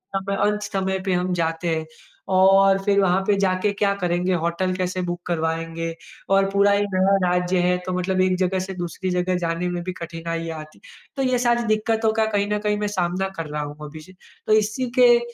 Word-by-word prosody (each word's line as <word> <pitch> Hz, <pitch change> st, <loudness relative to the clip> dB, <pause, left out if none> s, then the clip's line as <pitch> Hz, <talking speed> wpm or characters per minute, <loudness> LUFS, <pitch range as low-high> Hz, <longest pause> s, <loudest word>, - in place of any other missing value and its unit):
हम 195 Hz, 0 st, -2 dB
अंत 210 Hz, +1 st, +1 dB
समय 190 Hz, -2 st, -2 dB
पे 190 Hz, -, +1 dB
हम 180 Hz, +1 st, 0 dB
जाते 165 Hz, 0 st, -1 dB
हैं, 160 Hz, 0 st, -3 dB, 0.4 s
और 195 Hz, +1 st, +5 dB
फिर 200 Hz, 0 st, +3 dB
वहाँ 190 Hz, -1 st, +3 dB
पे 205 Hz, -, +4 dB
जा 190 Hz, -2 st, +2 dB
के 210 Hz, -, +3 dB
क्या 200 Hz, 0 st, +1 dB
करेंगे? 180 Hz, -1 st, 0 dB
होटल 170 Hz, +2 st, -1 dB
कैसे 185 Hz, 0 st, -2 dB
बुक 175 Hz, 0 st, -4 dB
करवाएँगे? 165 Hz, 0 st, -2 dB, 0.4 s
और 195 Hz, 0 st, +3 dB
पूरा 200 Hz, +1 st, +4 dB
एक 205 Hz, 0 st, +1 dB
नया 190 Hz, +1 st, +3 dB
राज्य 180 Hz, +1 st, +1 dB
है, 180 Hz, 0 st, +2 dB
तो 185 Hz, -, -3 dB
मतलब 185 Hz, +1 st, 0 dB
एक 185 Hz, 0 st, +2 dB
जगह 185 Hz, 0 st, 0 dB
से 190 Hz, +1 st, -5 dB
दूसरी 180 Hz, +1 st, -4 dB
जगह 180 Hz, 0 st, 0 dB
जाने 170 Hz, +1 st, -2 dB
में 175 Hz, 0 st, -3 dB
भी 185 Hz, 0 st, -4 dB
कठिनाइयाँ 165 Hz, -1 st, -5 dB
आती 155 Hz, 0 st, -12 dB
है। 480 Hz, -2 st, -19 dB
तो 270 Hz, -, -1 dB
ये 250 Hz, -, +3 dB
सारी 240 Hz, -1 st, +2 dB
दिक्कतों 220 Hz, +1 st, +1 dB
का 220 Hz, 0 st, +2 dB
कहीं 200 Hz, 0 st, +1 dB
ना 210 Hz, -, +1 dB
कहीं 210 Hz, -, +1 dB
मैं 210 Hz, -, -1 dB
सामना 185 Hz, +2 st, 0 dB
कर 165 Hz, -, -3 dB
रहा 150 Hz, 0 st, -3 dB
हूँ 145 Hz, 0 st, -8 dB
अभी 155 Hz, +1 st, -10 dB
से, 170 Hz, +4 st, -14 dB, 0.3 s
तो 215 Hz, -, +4 dB
इसी 215 Hz, +4 st, +1 dB
के 240 Hz, -1 st, +7 dB
185 Hz, 220 wpm, -22 LUFS, 175-200 Hz, 0.4 s, के